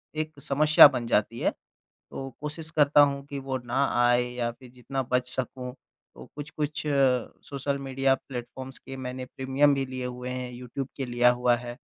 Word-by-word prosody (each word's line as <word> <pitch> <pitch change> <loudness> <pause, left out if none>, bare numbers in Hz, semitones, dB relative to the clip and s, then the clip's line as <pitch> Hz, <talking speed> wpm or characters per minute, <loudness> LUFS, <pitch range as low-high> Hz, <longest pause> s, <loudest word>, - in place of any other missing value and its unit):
एक 155 -1 -4
समस्या 150 +2 +7
बन 125 -4 -3
जाती 115 +1 +1
है, - - +1 0.4
तो 135 0 -9
कोशिश 155 +2 -5
करता 145 -2 +5
हूँ 140 -1 +2
कि 140 -1 -5
वो 135 -1 -3
ना 135 +3 +1 0.2
आए 120 0 +4
या 120 -1 -1
फिर 120 +1 -16
जितना 130 +2 -4
बच 125 0 +2
सकूँ 125 0 -2 0.4
तो - - -11
कुछ-कुछ 150 +1 -4
अ, 135 -4 +2
सोशल 140 0 -3
मीडिया 135 0 +1
प्लेटफ़ॉर्म्स 130 0 -8
के 135 - -9
मैंने 130 0 -5
प्रीमियम 135 +3 +2
भी 135 0 -1
लिए 130 -1 -5
हुए 125 0 -5
हैं। 125 -1 -4
यूट्यूब 125 +2 -6
के 135 - -2
लिया 120 0 +4
हुआ 125 0 +2
है 120 0 -7
130 Hz, 180 wpm, -27 LUFS, 125-140 Hz, 0.4 s, समस्या